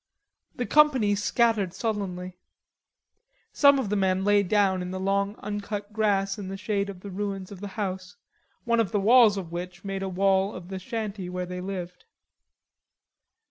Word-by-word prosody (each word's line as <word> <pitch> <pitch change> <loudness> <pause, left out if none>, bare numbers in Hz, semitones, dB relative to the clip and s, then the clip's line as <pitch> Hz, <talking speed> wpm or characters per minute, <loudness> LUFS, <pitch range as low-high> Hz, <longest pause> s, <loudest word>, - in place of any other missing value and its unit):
The 245 - -2
company 265 -5 +4
scattered 205 -2 +1
sullenly. 185 -5 -4 1.1
Some 280 -1 +6
of 255 -7 -2
the - - +2
men 190 -1 +1
lay 205 0 +4
down 195 -1 +2
in 180 - -4
the 185 0 -4
long 200 +1 0
uncut 205 0 -5
grass 200 -2 +1
in 195 - -6
the 195 +1 -5
shade 200 0 -1
of 185 -2 -9
the 200 - -8
ruins 195 -1 -4
of 195 - -9
the 205 - -4
house, 185 -3 -4 0.5
one 235 -1 +1
of 210 -6 +1
the 205 - +1
walls 220 0 +6
of 175 -4 -6
which 180 +2 -6
made 195 0 -3
a 195 - -2
wall 195 +1 +2
of 180 0 -9
the 190 -1 -5
shanty 205 -2 -4
where 180 0 -3
they 180 0 -6
lived. 180 - -6
195 Hz, 175 wpm, -26 LUFS, 185-210 Hz, 1.1 s, Some